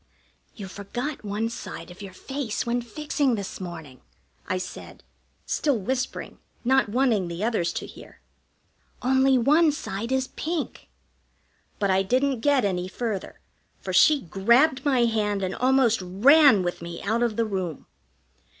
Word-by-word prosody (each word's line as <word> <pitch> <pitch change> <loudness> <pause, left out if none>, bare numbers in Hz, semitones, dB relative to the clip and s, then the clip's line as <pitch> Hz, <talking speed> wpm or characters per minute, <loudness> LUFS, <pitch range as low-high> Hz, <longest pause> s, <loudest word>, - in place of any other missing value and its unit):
"You 200 -3 -7
forgot 240 +10 -5
one 210 +2 -2
side 175 -6 -8
of 180 - -13
your 195 -1 -8
face 270 -6 -4
when 240 +1 0
fixing 280 +1 -1
this 200 -2 -6
morning," 160 -8 -8 0.5
I 185 - 0
said, 180 -1 -8 0.4
still 285 -5 0
whispering, 250 +5 -4 0.3
not 265 -2 +3
wanting 230 -5 +1
the 170 +3 -5
others 215 -7 0
to - - -4
hear. - - -14 0.8
"Only 265 +1 +4
one 300 +6 +4
side 230 -4 -5
is 265 0 0
pink 325 0 -4 0.4
" - - -41
But 200 -2 +1
I 190 0 +3
didn't 255 +6 +1
get 275 -2 +2
any 180 -2 -1
further, 210 0 -5 0.4
for 185 - -5
she 280 +10 +5
grabbed 235 - +3
my 260 -4 +3
hand 210 -3 0
and 185 - -2
almost 255 -4 +2
ran 215 - +5
with 175 -1 -3
me 170 0 -7
out 220 +3 0
of 235 -3 +1
the 230 - +1
room. 185 -7 -4
225 Hz, 150 wpm, -25 LUFS, 190-265 Hz, 0.8 s, she